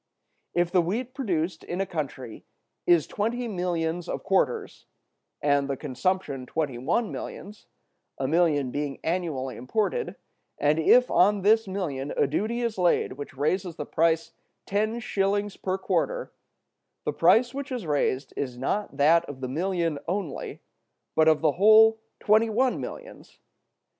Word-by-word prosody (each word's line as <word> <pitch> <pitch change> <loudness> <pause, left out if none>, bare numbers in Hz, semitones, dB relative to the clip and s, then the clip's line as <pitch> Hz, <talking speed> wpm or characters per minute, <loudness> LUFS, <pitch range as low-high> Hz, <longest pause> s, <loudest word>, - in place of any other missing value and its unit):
If 175 0 +1
the 180 -1 +4
wheat 230 +9 -3
produced 180 - -2
in 175 - -5
a 195 - +1
country 135 - -5 0.4
is 170 -4 +5
twenty 235 +4 -2
millions 175 -3 -2
of - - -4
quarters, 185 -10 0 0.6
and 140 -1 +2
the 135 - -2
consumption 140 -1 -2
twenty 145 -6 -2
one 175 - 0
millions, 210 +1 -8 0.5
a 135 - -1
million 150 -4 +2
being 145 0 -3
annually 155 -8 -2
imported, 215 - -1 0.4
and 150 +2 +2
if 250 +10 +5
on 200 +2 +4
this 220 +1 +4
million 150 -8 -3
a - - +4
duty 215 - -1
is 230 -4 -2
laid 175 -1 +2
which 140 -1 -9
raises 175 +4 -1
the 150 - -5
price 165 +1 +1 0.3
ten 215 +3 0
shillings 205 -2 -1
per 190 0 -2
quarter, - - -1 0.7
the - - -1
price 240 +3 +4
which 280 +1 -5
is 245 -7 -3
raised 140 -3 0
is 125 -3 -4
not 140 +4 -2
that 160 +4 +5
of 145 -4 -9
the 130 - -4
million 165 +1 -1
only, 180 -5 -4 0.5
but 160 0 +4
of 155 -1 +4
the 155 -2 +3
whole 220 +5 +6 0.2
twenty 220 +2 +3
one 250 +4 +1
millions. - - -9
175 Hz, 150 wpm, -26 LUFS, 145-210 Hz, 0.7 s, whole